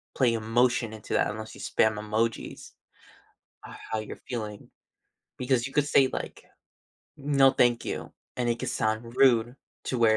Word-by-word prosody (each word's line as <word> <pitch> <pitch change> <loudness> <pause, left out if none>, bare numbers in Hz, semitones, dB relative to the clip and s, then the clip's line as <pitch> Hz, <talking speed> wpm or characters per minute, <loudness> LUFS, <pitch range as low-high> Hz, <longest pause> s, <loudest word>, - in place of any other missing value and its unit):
play 125 -3 +3
emotion 115 +1 +1
into 110 - -7
that - - +2
unless 110 +1 -7
you - - -11
spam 110 -1 +2
emojis 110 +2 -2 0.9
how 110 - -6
you're 110 - -7
feeling 105 -4 -5 0.7
because 125 0 +1
you - - -12
could 145 -1 +2
say, 135 -3 +5
like, - - -6 0.7
"No, 140 -1 +4
thank 120 -2 +3
you," - - -5 0.2
and 120 -1 0
it 120 - 0
could - - -2
sound 110 +2 -2
rude, 120 -1 +4 0.3
to 125 - -2
where 110 -2 +5
120 Hz, 155 wpm, -27 LUFS, 110-130 Hz, 0.9 s, say